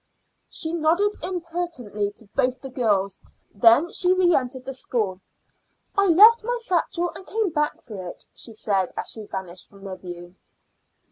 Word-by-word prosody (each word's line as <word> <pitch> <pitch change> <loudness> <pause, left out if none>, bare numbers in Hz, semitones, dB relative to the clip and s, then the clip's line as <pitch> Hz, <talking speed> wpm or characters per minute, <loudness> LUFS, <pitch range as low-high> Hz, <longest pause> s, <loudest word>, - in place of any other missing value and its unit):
She 320 0 -3
nodded 340 +6 +2
impertinently 335 - -3
to 225 - -12
both 255 0 +1
the 270 - -9
girls, 200 -6 +1 0.3
and 200 - -23
then 245 +9 +6 0.3
reentered 265 -8 +2
the 270 - -4
school. 215 -7 -2 0.7
"I 400 0 +4
left 430 +7 +8
my 485 +2 -1
satchel 350 -4 0
and 380 - -10
came 430 -4 0
back 300 -1 0
for 190 -5 -7
it," - - -12
she 230 - -7
said 195 -4 0
as - - -3
she 215 -2 -7
vanished 185 -2 -7
from 200 -1 -17
their 190 -2 -6
view. 175 0 -9
255 Hz, 155 wpm, -24 LUFS, -, 0.7 s, left